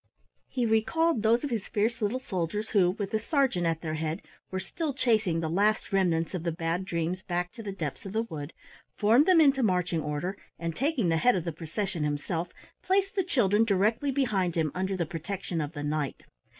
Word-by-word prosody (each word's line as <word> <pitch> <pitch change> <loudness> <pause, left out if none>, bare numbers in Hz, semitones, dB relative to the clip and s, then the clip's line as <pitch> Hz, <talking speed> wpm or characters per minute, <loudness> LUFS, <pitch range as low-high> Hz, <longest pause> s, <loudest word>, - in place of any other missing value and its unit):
He 250 -2 -1
recalled 230 +6 +2
those 225 +4 +3
of 290 - -2
his 220 -4 -2
fierce 225 +3 0
little 210 +4 +1
soldiers 210 -2 -3
who, 190 -5 +4
with 195 +1 -3
the 220 - +1
sergeant 240 - +1
at 165 -1 -1
their 155 -2 -3
head, 155 +1 -3 0.3
were 190 - -3
still 290 - -3
chasing 215 -10 +2
the 160 - -1
last 205 +5 +1
remnants 170 -4 +2
of 180 - -2
the 170 0 -1
Bad 165 +2 -2
Dreams 170 +1 -2
back 180 -1 -2
to 230 - -9
the 205 -3 -4
depths 170 -1 -5
of 190 - -7
the 225 +1 +1
wood, 155 -7 -6 0.5
formed 230 +8 +5
them 365 -3 +6
into 275 -4 +5
marching 180 -6 +1
order, 150 +6 -3 0.2
and 165 -1 -3
taking 270 - +1
the 165 - +3
head 245 +9 +4
of 180 - -1
the 170 - -2
procession 165 +2 -3
himself, 160 +4 -2 0.3
placed 390 +1 +1
the 385 - +2
children 225 - +3
directly 220 +6 +2
behind 215 -11 +1
him 160 -3 +1
under 190 +1 -1
the 170 - 0
protection 170 +1 -4
of 150 +1 -4
the 145 -2 -5
Knight. 150 -2 -2
190 Hz, 205 wpm, -28 LUFS, 165-225 Hz, 0.5 s, them